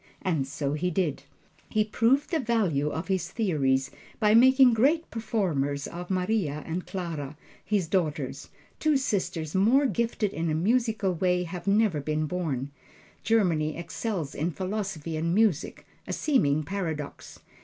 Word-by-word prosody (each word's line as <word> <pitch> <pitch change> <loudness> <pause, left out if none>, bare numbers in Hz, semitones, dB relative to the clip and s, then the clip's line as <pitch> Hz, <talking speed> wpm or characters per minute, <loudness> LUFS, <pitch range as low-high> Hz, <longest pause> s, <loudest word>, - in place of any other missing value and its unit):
And 160 -8 0
so 140 0 -2
he 170 +4 0
did. 160 -6 -1 0.4
He 215 -1 +2
proved 235 +8 +1
the 325 - +1
value 200 - +1
of 160 +3 -4
his 190 -2 -1
theories 135 - 0 0.3
by 210 -2 +4
making 260 +2 +7
great 295 +9 +2
performers 155 -12 -1
of 175 +1 -7
Maria 185 -6 0
and 170 +2 -4
Clara, 155 -6 -5 0.3
his 200 -5 0
daughters 150 -7 -2 0.3
two 310 -2 +3
sisters 180 - -2
more 230 +9 +4
gifted 235 -5 0
in 165 0 -1
a 155 - 0
musical 215 +1 +1
way 180 +1 +1
have 180 +2 -7
never 200 -6 +3
been 155 +2 -1
born. 145 -5 -3 0.5
Germany 170 -9 +2
excels 170 -2 -4
in 160 +4 -1
philosophy 185 -4 -4
and 170 +2 0
music 205 -6 +1 0.2
a - - -3
seeming 155 - +2
paradox. 160 -5 -5
180 Hz, 145 wpm, -27 LUFS, 155-220 Hz, 0.5 s, making